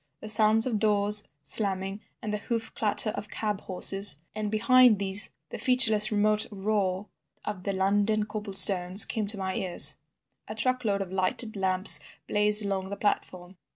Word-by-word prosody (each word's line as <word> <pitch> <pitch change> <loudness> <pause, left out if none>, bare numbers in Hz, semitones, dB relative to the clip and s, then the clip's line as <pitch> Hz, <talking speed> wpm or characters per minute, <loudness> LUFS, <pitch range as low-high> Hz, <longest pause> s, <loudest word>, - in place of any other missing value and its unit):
The 215 - -9
sounds 215 +1 +4
of 230 -5 -3
doors 210 -1 +1
slamming, 195 +4 -3 0.2
and 210 -1 -5
the 210 - -4
hoof 225 +2 -5
clatter 215 0 +1
of 210 - -8
cab 210 -2 -4
horses, 195 0 +2 0.2
and 215 -1 -5
behind 230 +1 +3
these 195 +1 +1
things - - -28
the - - -9
featureless 220 -5 +3
remote 210 0 0
roar 195 -1 -3 0.4
of 195 -3 -7
the 200 - -3
London 205 +3 -1
cobble 210 -1 -8
stones, 190 0 +6
came 215 -2 -5
to 210 +1 -3
my 190 -1 -5
ears. 180 -2 -1 0.5
A 215 - -8
truckload 220 -4 -2
of 185 - -14
lighted 190 +4 -3
lamps 190 0 +4 0.3
blazed 210 0 +2
along 190 -1 -4
the 200 - -7
platform. 185 -3 -4
205 Hz, 165 wpm, -26 LUFS, 195-215 Hz, 0.5 s, stones